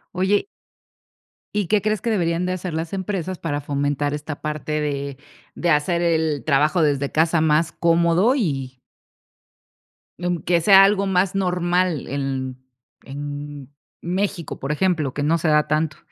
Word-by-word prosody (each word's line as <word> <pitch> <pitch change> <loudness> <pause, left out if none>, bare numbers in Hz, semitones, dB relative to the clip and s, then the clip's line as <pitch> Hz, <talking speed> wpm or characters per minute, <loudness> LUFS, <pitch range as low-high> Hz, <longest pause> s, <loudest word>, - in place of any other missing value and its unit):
Oye 190 - +1 1.1
¿Y 205 -3 0
qué 205 +1 +2
crees 215 -2 0
que 235 - -2
deberían 175 -4 0
de 185 - -1
hacer 180 -2 -5
las 160 +2 -4
empresas 185 -2 -3
para 145 -3 -3
fomentar 145 0 -1
esta 150 0 -7
parte 150 0 -3
de 140 -2 -3 0.4
de 175 - -1
hacer 170 +3 +2
el 160 -3 +1
trabajo 155 +4 +2
desde 140 -2 +1
casa 160 +2 +2
más 160 +1 +2
cómodo? 170 +6 +3
Y 135 - -2 1.4
mm, 175 -1 -1
que 170 -1 +2
sea 195 +1 +8
algo 200 0 +3
más 190 0 +1
normal 180 -3 0
en 135 -1 -3 0.5
en 145 0 -7 0.3
México, 185 -2 -2
¿por 135 - -3
ejemplo? 155 -4 0
Que 145 - -3
no 160 +3 +2
se 160 0 0
da 150 0 +3
tanto. 155 0 0
160 Hz, 150 wpm, -22 LUFS, 145-180 Hz, 1.4 s, sea